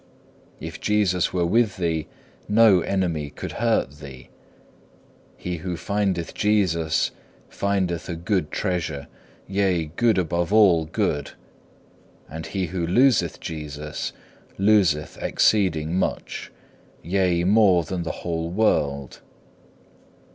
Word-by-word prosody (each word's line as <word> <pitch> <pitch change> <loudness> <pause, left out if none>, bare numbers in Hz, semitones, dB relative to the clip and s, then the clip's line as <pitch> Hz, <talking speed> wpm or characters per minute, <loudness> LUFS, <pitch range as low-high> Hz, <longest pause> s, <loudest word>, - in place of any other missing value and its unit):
If - - -8
Jesus 100 -4 +1
were 90 -2 0
with 110 +3 +2
thee 80 -4 -1 0.4
no 105 -3 +6
enemy 85 -5 -1
could 75 - -7
hurt 110 -11 0
thee. 65 -4 -11 1.1
He 90 -1 -4
who 85 +1 -4
findeth 95 -3 -1
Jesus 90 -7 +1 0.4
findeth 95 -4 -1
a 85 - -3
good 85 -1 -1
treasure, 80 -7 -2 0.4
yea, 95 -5 0
good 120 -3 +3
above 85 0 0
all 95 -7 +5
good; 75 -2 -2 0.9
and 80 +2 -7
he 95 -2 -2
who 85 0 -3
loseth 125 +6 +3
Jesus 75 -1 -5 0.5
loseth 95 -7 +2
exceeding 85 -7 +2
much, - - -3 0.5
yea, 90 -1 +1
more 95 -2 +4
than 90 +2 -4
the 85 - -3
whole 85 -1 -2
world. 70 - 0
90 Hz, 110 wpm, -24 LUFS, 80-100 Hz, 1.1 s, no